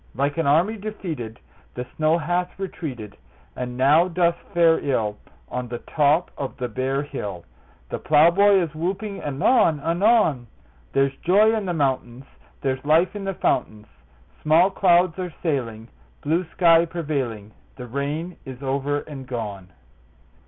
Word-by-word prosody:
Like 140 Hz, +5 st, -1 dB
an 165 Hz, -, +1 dB
army 175 Hz, +10 st, +3 dB
defeated 165 Hz, -, -6 dB, 0.4 s
The 125 Hz, -, -4 dB
snow 155 Hz, +1 st, +2 dB
hath 175 Hz, +2 st, -2 dB
retreated, 130 Hz, -, -6 dB, 0.4 s
And 125 Hz, -1 st, -5 dB
now 150 Hz, +7 st, +4 dB
doth 170 Hz, -1 st, +1 dB, 0.2 s
fare 165 Hz, -1 st, +4 dB
ill 110 Hz, -7 st, -1 dB, 0.3 s
On 125 Hz, 0 st, -4 dB
the 120 Hz, 0 st, -5 dB
top 150 Hz, +6 st, +1 dB
of 135 Hz, -, -5 dB
the 125 Hz, -2 st, -3 dB
bare 130 Hz, +4 st, -2 dB
hill; 100 Hz, -, -6 dB, 0.4 s
The -, -, -4 dB
plowboy 175 Hz, +6 st, +5 dB
is 160 Hz, -3 st, -5 dB
whooping 195 Hz, +5 st, -3 dB
anon 155 Hz, -, +2 dB
anon: 165 Hz, -, +2 dB, 0.4 s
There's 135 Hz, 0 st, +1 dB
joy 210 Hz, +5 st, +4 dB
in 210 Hz, -3 st, -3 dB
the 175 Hz, -, -1 dB
mountains; 130 Hz, -3 st, -1 dB, 0.4 s
There's 130 Hz, -1 st, -2 dB
life 160 Hz, +7 st, +3 dB
in 200 Hz, -1 st, -5 dB
the 195 Hz, -1 st, -3 dB
fountains; 105 Hz, -8 st, -1 dB, 0.6 s
Small 165 Hz, +5 st, +4 dB
clouds 180 Hz, -2 st, +3 dB
are 180 Hz, -3 st, -5 dB
sailing, 115 Hz, -9 st, -2 dB, 0.4 s
Blue 165 Hz, +5 st, 0 dB
sky 165 Hz, -2 st, +5 dB
prevailing; 140 Hz, -11 st, -4 dB, 0.2 s
The 125 Hz, -, -8 dB
rain 145 Hz, +8 st, -4 dB
is 130 Hz, 0 st, -9 dB
over 140 Hz, +2 st, -1 dB
and 135 Hz, -4 st, -9 dB
gone! 105 Hz, -7 st, -5 dB
150 Hz, 145 wpm, -23 LUFS, 130-175 Hz, 0.6 s, plowboy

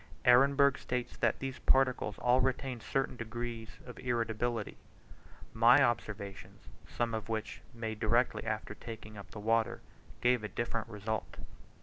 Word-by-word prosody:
Ehrenberg 140 Hz, +2 st, +6 dB
states 125 Hz, -1 st, -3 dB
that -, -, +2 dB
these 135 Hz, -1 st, -5 dB
particles 130 Hz, -5 st, +2 dB
all 125 Hz, +1 st, +3 dB
retain 130 Hz, -1 st, -1 dB
a -, -, -16 dB
certain 135 Hz, +4 st, -1 dB
degree 115 Hz, 0 st, -5 dB, 0.2 s
of 125 Hz, -, -10 dB
irritability. 115 Hz, -2 st, -1 dB, 0.8 s
My 120 Hz, +5 st, +6 dB
observations, 110 Hz, -5 st, -3 dB, 0.2 s
some 120 Hz, -1 st, -2 dB
of 110 Hz, 0 st, -4 dB
which 110 Hz, 0 st, -3 dB
were 120 Hz, -3 st, -15 dB
made 110 Hz, -1 st, -3 dB
directly 120 Hz, +3 st, +2 dB
after 110 Hz, -1 st, -3 dB
taking 110 Hz, -1 st, -9 dB
up 100 Hz, -3 st, -10 dB
the 105 Hz, -, -9 dB
water, 115 Hz, +1 st, +1 dB, 0.4 s
gave 125 Hz, -2 st, +3 dB
a -, -, -2 dB
different 115 Hz, 0 st, -3 dB
result. 110 Hz, 0 st, -4 dB
115 Hz, 145 wpm, -32 LUFS, 110-125 Hz, 0.8 s, Ehrenberg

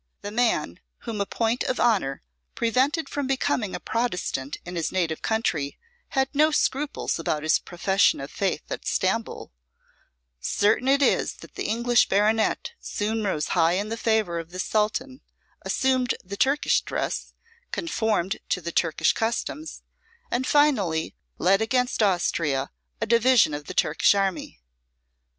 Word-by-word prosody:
The 205 Hz, -, -5 dB
man 240 Hz, +2 st, 0 dB, 0.2 s
whom 220 Hz, -4 st, -4 dB
a 200 Hz, -, -1 dB
point 230 Hz, +1 st, 0 dB
of 255 Hz, -, -1 dB
honour 195 Hz, -, +1 dB, 0.3 s
prevented 260 Hz, +8 st, +1 dB
from 285 Hz, -2 st, -3 dB
becoming 260 Hz, -7 st, 0 dB
a -, -, -4 dB
Protestant 180 Hz, -, -2 dB
in 175 Hz, +1 st, -7 dB
his 165 Hz, -2 st, -1 dB
native 170 Hz, -4 st, -1 dB
country 160 Hz, -11 st, -1 dB, 0.4 s
had 265 Hz, 0 st, +3 dB
no 305 Hz, +2 st, +4 dB
scruples 295 Hz, -, -1 dB
about 155 Hz, -2 st, -1 dB
his 155 Hz, -, +3 dB
profession 190 Hz, +2 st, +1 dB
of 135 Hz, +1 st, -7 dB
faith 195 Hz, -2 st, -1 dB
at -, -, -5 dB
Stamboul: -, -, -1 dB, 0.9 s
certain 210 Hz, -, +1 dB
it 280 Hz, +1 st, +4 dB
is -, -, +2 dB
that -, -, -14 dB
the -, -, -4 dB
English 235 Hz, +2 st, +2 dB
baronet 215 Hz, -, +1 dB
soon 215 Hz, +2 st, -2 dB
rose 155 Hz, -7 st, -1 dB
high 170 Hz, -1 st, +3 dB
in 200 Hz, +3 st, -1 dB
the 225 Hz, -, -2 dB
favour 220 Hz, -7 st, 0 dB
of 165 Hz, 0 st, -8 dB
the 180 Hz, -, -9 dB
Sultan, 220 Hz, +7 st, -1 dB, 0.4 s
assumed 260 Hz, -2 st, +1 dB
the 195 Hz, +2 st, -7 dB
Turkish 275 Hz, +7 st, +2 dB
dress, -, -, -4 dB, 0.4 s
conformed 220 Hz, -, -1 dB
to -, -, +1 dB
the 170 Hz, -1 st, -5 dB
Turkish 165 Hz, -2 st, +2 dB
customs, 235 Hz, +7 st, -3 dB, 0.5 s
and 255 Hz, +2 st, 0 dB
finally, 210 Hz, -, +2 dB, 0.2 s
led 195 Hz, +4 st, +3 dB
against 250 Hz, +2 st, +1 dB
Austria 165 Hz, -8 st, +1 dB, 0.3 s
a -, -, 0 dB
division 235 Hz, -6 st, +4 dB
of 145 Hz, 0 st, -5 dB
the 185 Hz, -, -7 dB
Turkish -, -, +3 dB
army. 195 Hz, -, -2 dB
215 Hz, 145 wpm, -25 LUFS, 180-250 Hz, 0.9 s, no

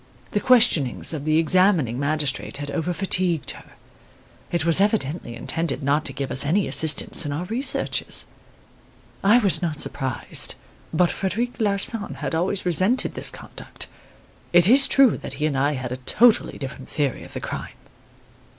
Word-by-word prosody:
The 205 Hz, -, -1 dB
questionings 205 Hz, -, +3 dB
of 150 Hz, -2 st, -6 dB
the 155 Hz, 0 st, +1 dB
examining 165 Hz, -, +2 dB
magistrate 145 Hz, -2 st, -2 dB
had 145 Hz, 0 st, -6 dB
over 165 Hz, +4 st, -3 dB
fatigued 180 Hz, -4 st, -1 dB
her. -, -, -15 dB, 0.8 s
It 170 Hz, -2 st, -2 dB
was 170 Hz, +3 st, +3 dB
evidently 170 Hz, -, -2 dB
intended 165 Hz, +5 st, -3 dB
not 145 Hz, +3 st, 0 dB
to -, -, -2 dB
give 135 Hz, 0 st, -6 dB
us 130 Hz, -, +2 dB
any 180 Hz, +7 st, 0 dB
assistance 160 Hz, +1 st, +3 dB
in 145 Hz, -, -5 dB
our 155 Hz, +5 st, -4 dB
researches. 255 Hz, +7 st, 0 dB, 1.0 s
I 205 Hz, +4 st, +5 dB
was 200 Hz, -8 st, +5 dB
not 160 Hz, -4 st, -4 dB
surprised; 130 Hz, -3 st, 0 dB, 0.4 s
but 175 Hz, +2 st, +1 dB
Frederic 230 Hz, +7 st, -4 dB
Larsan 205 Hz, +1 st, -1 dB
had -, -, -6 dB
always 180 Hz, +4 st, -2 dB
resented 185 Hz, +8 st, +3 dB
this -, -, +2 dB
conduct. -, -, -8 dB, 0.6 s
It 175 Hz, 0 st, +6 dB
is 265 Hz, +5 st, +7 dB
true 270 Hz, -5 st, +4 dB
that -, -, -7 dB
he 150 Hz, +2 st, -3 dB
and 150 Hz, -3 st, -2 dB
I 140 Hz, +2 st, 0 dB
had 130 Hz, -3 st, -6 dB
a 125 Hz, -, -4 dB
totally 220 Hz, -, +2 dB
different 135 Hz, -1 st, -9 dB
theory 145 Hz, -4 st, -3 dB
of -, -, -13 dB
the -, -, -5 dB
crime. -, -, -7 dB
165 Hz, 160 wpm, -22 LUFS, 145-200 Hz, 1.0 s, is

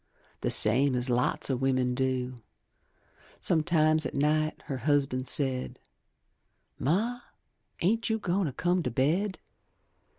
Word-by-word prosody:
The -, -, -2 dB
same 130 Hz, +5 st, +7 dB
as 125 Hz, +1 st, 0 dB
lots 125 Hz, +3 st, -1 dB
of 130 Hz, -, -2 dB
wimmin 130 Hz, -2 st, 0 dB
do; 130 Hz, -1 st, -2 dB, 1.1 s
Sometimes 155 Hz, -1 st, +1 dB
at -, -, -5 dB
night 155 Hz, +2 st, -1 dB
her 135 Hz, -, -5 dB
husban' 135 Hz, -2 st, -1 dB
said, 130 Hz, -1 st, -1 dB, 1.0 s
"Ma, 220 Hz, -, -1 dB, 0.6 s
ain't 225 Hz, +6 st, 0 dB
you 220 Hz, -, 0 dB
goin' 190 Hz, -3 st, -2 dB
to -, -, -4 dB
come 180 Hz, +6 st, -1 dB
to 140 Hz, -, -3 dB
bed?" 165 Hz, -, -1 dB
145 Hz, 125 wpm, -27 LUFS, 130-175 Hz, 1.1 s, same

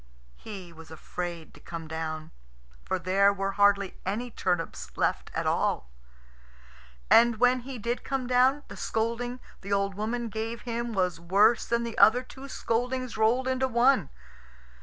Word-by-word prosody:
He 190 Hz, -5 st, -9 dB
was 165 Hz, -1 st, -13 dB
afraid 170 Hz, +1 st, -6 dB
to -, -, -15 dB
come 165 Hz, -2 st, -7 dB
down, 155 Hz, 0 st, -5 dB, 0.5 s
for 190 Hz, -, -1 dB
there 195 Hz, +3 st, +3 dB
were 195 Hz, 0 st, -2 dB
hardly 200 Hz, -1 st, +2 dB
any 230 Hz, +6 st, -3 dB
turnips 165 Hz, -, -3 dB
left -, -, 0 dB
at -, -, -1 dB
all. 60 Hz, -, 0 dB, 1.2 s
And 235 Hz, 0 st, +6 dB
when 250 Hz, +2 st, +4 dB
he 255 Hz, +1 st, -7 dB
did 235 Hz, +2 st, -3 dB
come 270 Hz, -2 st, -2 dB
down, 255 Hz, +3 st, +3 dB
the -, -, -9 dB
scolding 235 Hz, +3 st, -2 dB, 0.2 s
the 200 Hz, -, -8 dB
old 200 Hz, 0 st, +1 dB
woman 225 Hz, +4 st, -3 dB
gave 225 Hz, +1 st, -4 dB
him 235 Hz, -1 st, -3 dB
was 180 Hz, -4 st, 0 dB
worse 200 Hz, +7 st, +3 dB
than 235 Hz, 0 st, +1 dB
the 235 Hz, -1 st, -4 dB
other 245 Hz, +4 st, +6 dB
two 265 Hz, +1 st, -11 dB
scoldings 250 Hz, +1 st, -2 dB
rolled 230 Hz, +4 st, +2 dB
into 260 Hz, 0 st, +1 dB
one. 240 Hz, -, +3 dB
220 Hz, 155 wpm, -28 LUFS, 185-245 Hz, 1.2 s, And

